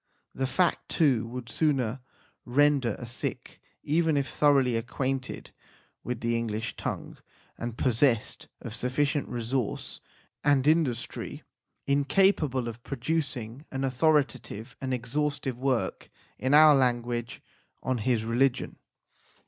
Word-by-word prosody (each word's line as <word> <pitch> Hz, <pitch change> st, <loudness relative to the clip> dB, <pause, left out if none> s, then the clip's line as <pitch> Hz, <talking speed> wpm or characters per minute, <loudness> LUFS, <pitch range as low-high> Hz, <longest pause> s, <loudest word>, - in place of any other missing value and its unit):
This 135 Hz, 0 st, -2 dB
fact, 180 Hz, -2 st, +1 dB
too, 130 Hz, -8 st, +2 dB
would 125 Hz, 0 st, -7 dB
soon 130 Hz, -2 st, 0 dB, 0.4 s
render 135 Hz, -3 st, +3 dB
a 120 Hz, -, -7 dB
Sikh, 120 Hz, +1 st, -5 dB, 0.2 s
even 160 Hz, 0 st, +2 dB
if 140 Hz, -1 st, 0 dB
thoroughly 135 Hz, -5 st, +3 dB
acquainted 130 Hz, +3 st, -3 dB, 0.5 s
with 125 Hz, -1 st, -4 dB
the 115 Hz, 0 st, 0 dB
English 115 Hz, -1 st, -2 dB
tongue, -, -, -5 dB, 0.4 s
and 120 Hz, 0 st, -5 dB
possessed 120 Hz, -2 st, +1 dB
of -, -, -6 dB
sufficient 140 Hz, +5 st, 0 dB
resource 120 Hz, -1 st, -2 dB, 0.4 s
and 140 Hz, -2 st, +3 dB
in 160 Hz, +2 st, +5 dB
dustry, 120 Hz, -3 st, -5 dB, 0.4 s
incapable 140 Hz, -2 st, +2 dB
of 115 Hz, 0 st, -7 dB
producing 135 Hz, -2 st, -3 dB
an 135 Hz, 0 st, -3 dB
authoritative 130 Hz, -4 st, 0 dB
and 130 Hz, -1 st, -3 dB
exhaustive 130 Hz, +1 st, -2 dB
work 130 Hz, -2 st, -1 dB, 0.3 s
in 130 Hz, +3 st, +3 dB
our 155 Hz, 0 st, +9 dB
language 120 Hz, -3 st, 0 dB, 0.4 s
on 130 Hz, -2 st, 0 dB
his 110 Hz, 0 st, +1 dB
religion. 120 Hz, +3 st, +1 dB
130 Hz, 115 wpm, -28 LUFS, 120-145 Hz, 0.5 s, our